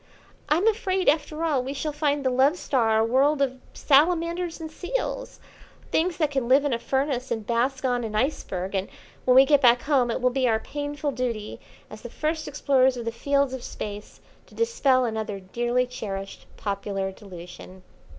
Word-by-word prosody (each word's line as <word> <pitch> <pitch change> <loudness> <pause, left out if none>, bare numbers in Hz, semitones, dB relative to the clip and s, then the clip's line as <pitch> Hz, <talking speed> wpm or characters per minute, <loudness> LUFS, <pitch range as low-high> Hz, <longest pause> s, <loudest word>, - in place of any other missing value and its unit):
I'm 330 +7 +2
afraid, 385 -4 0
after 305 +2 +1
all, 300 -6 +1
we 265 +2 -4
shall 295 +2 -3
find 290 -2 0
the 260 - +3
Love 270 +6 +3
Star 230 -9 +1
a 220 - +3
world 275 +5 +3
of 260 -2 -1
salamanders 335 +3 +2
and 320 -1 -7
seals; - - -4 0.5
things 340 +2 +1
that 305 -4 +1
can 270 -4 -1
live 270 +3 +4
in 285 - +1
a 235 - -1
furnace 265 0 -1
and 220 -2 -3
bask 255 +4 0
on 245 -1 0
an 215 -2 -5
iceberg; 195 -7 -2
and 195 0 -1 0.4
when 250 - +4
we 265 +1 +8
get 290 -1 +4
back 245 -2 +5
home 270 -5 +2
it 230 - -1
will 250 0 +2
be 260 0 +1
our 220 -2 +2
painful 290 +3 -4
duty, 235 -5 -4 0.3
as - - -11
the - - -8
first 310 0 -2
explorers 265 -3 +2
of 235 - -5
the 230 - -1
fields 280 +3 0
of 260 - -5
Space, 205 -3 -7 0.3
to - - -18
dispel 280 - +2
another 220 -3 -3
dearly 240 +6 -1
cherished 200 -6 -7
popular 200 -1 -3
delusion." 185 -1 -12
260 Hz, 185 wpm, -25 LUFS, 230-295 Hz, 0.5 s, we